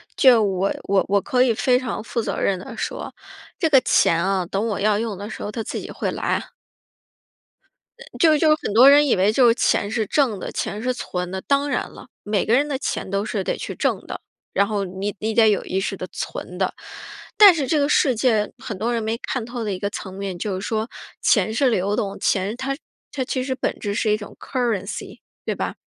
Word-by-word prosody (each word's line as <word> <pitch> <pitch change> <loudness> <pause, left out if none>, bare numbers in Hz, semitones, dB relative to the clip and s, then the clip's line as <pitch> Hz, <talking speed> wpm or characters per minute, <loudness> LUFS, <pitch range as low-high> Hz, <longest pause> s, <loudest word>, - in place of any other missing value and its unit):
就 245 -5 +6
我 195 0 0
我 195 -2 +2
我 200 0 +2
可 250 +4 +2
以 245 - +3
非 250 +3 +2
常 250 -4 -4
负 230 +2 -3
责 - - -3
任 195 - +1
地 180 - -9
说， - - -5 0.5
这 325 - +2
个 275 -3 +7
钱 165 0 +3
啊， 190 -1 +1
等 195 +4 -1
我 205 -2 -2
要 210 0 +2
用 220 -1 -2
的 205 +2 -7
时 - - -7
候 205 - -4
它 225 - -4
自 - - -4
己 - - -8
会 - - -3
来 - - -6
啊。 - - -2 1.7
就 315 -2 +5
就 305 0 +4
很 205 - -4
多 255 +5 +8
人 290 +1 +6
以 - - +3
为 195 +3 +3
就 245 +2 +4
是 230 - +4
钱 205 - +1
是 220 0 -1
挣 255 -9 +1
的、 - - -5
钱 210 +2 -3
是 255 0 0
存 180 -6 -4
的。 190 0 -4
当 280 +1 +1
然 255 - -1
了， - - -13 0.2
每 205 -2 0
个 225 - +1
人 285 +4 +3
的 280 - -2
钱 260 - -3
都 200 +1 -1
是 210 -4 -2
得 - - -1
去 - - -5
挣 - - -1
的， - - -7 0.3
然 200 0 +2
后 205 -2 -1
你 195 +2 -4
你 220 +1 -2
得 220 -1 +5
有 205 - +1
意 190 - -2
识 195 +1 -2
地 185 - -6
存 180 - -6
的。 190 0 0 0.6
但 410 -3 +10
是 280 -5 -1
这 310 - +2
个 285 - +2
世 265 -4 +3
界 220 -3 +1
很 235 -6 -6
多 230 +5 -1
人 230 - -1
没 225 +1 -1
看 245 -1 -4
透 240 0 -5
的 210 - -2
一 185 - -4
个 200 - -2
层 190 -2 -7
面， 195 -2 -5
就 190 0 -3
是 - - -6
说 220 0 -2 0.3
钱 220 - +3
是 265 +3 +3
流 200 -2 0
动 200 -1 -3
钱 200 +3 0
它 270 +1 -2 0.4
它 265 - -2
其 255 0 -2
实 260 -1 -2
本 - - -2
质 205 -1 -3
是 215 0 +1
一 210 - +2
种 205 - -10
currency， 220 -6 -3 0.3
对 - - -1
吧？ - - -3
220 Hz, 270 characters per minute, -22 LUFS, 200-255 Hz, 1.7 s, 但